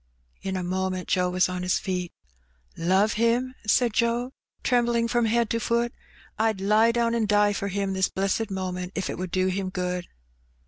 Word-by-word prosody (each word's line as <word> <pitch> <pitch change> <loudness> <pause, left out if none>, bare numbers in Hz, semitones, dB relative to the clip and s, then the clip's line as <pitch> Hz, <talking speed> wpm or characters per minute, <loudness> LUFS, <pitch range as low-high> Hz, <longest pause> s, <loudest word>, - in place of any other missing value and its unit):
'* - - -39
In 190 - -2
a 185 - -2
moment 185 0 -2
Joe 180 -1 +2
was 180 0 +2
on 180 0 -4
his 180 0 +1
feet. 180 -2 -3 0.4
" - - -38 0.2
Love 190 +5 +2
him! 245 +2 +2
" - - -31
said 235 +1 +3
Joe, 240 +2 0 0.3
trembling 235 -2 +2
from 240 0 +1
head 230 +1 +2
to 230 - +1
foot. 235 +1 0 0.5
"I'd 220 -2 +1
lie 215 +4 +4
down 235 0 +1
an' 230 -2 +1
die 205 0 +3
for 200 - -3
him 200 0 -1
this 190 -1 +1
blessed 195 +3 -1
moment 185 -1 -4
if 195 - -2
it - - -6
would 185 0 -3
do 185 +1 +1
him 190 0 -1
good." 180 -1 -3
200 Hz, 200 wpm, -26 LUFS, 185-230 Hz, 0.5 s, lie